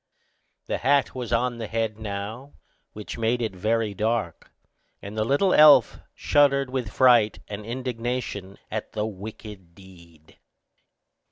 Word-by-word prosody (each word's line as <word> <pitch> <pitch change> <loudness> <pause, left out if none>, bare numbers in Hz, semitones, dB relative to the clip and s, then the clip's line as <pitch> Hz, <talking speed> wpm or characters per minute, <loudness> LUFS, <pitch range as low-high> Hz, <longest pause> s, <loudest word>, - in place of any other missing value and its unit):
The - - -3
hat 140 +1 +2
was 125 -3 -6
on 120 0 0
the 110 - -4
head 110 -1 -2
now, 110 +6 -6 0.4
which 105 +2 -8
made 115 +2 +1
it 110 -4 -2
very 110 +2 -1
dark, 105 -4 -2 0.5
and 100 +2 -9
the 110 - 0
little 145 - +2
elf 150 -7 +6 0.2
shuddered 140 -2 +2
with 125 -6 -3
fright 120 -4 +4
and 105 0 -7
indignation 120 -5 -4
at 110 0 -5
the 105 -1 -2
wicked 100 -3 -9
deed. 85 -5 -18
110 Hz, 135 wpm, -25 LUFS, 105-125 Hz, 0.5 s, elf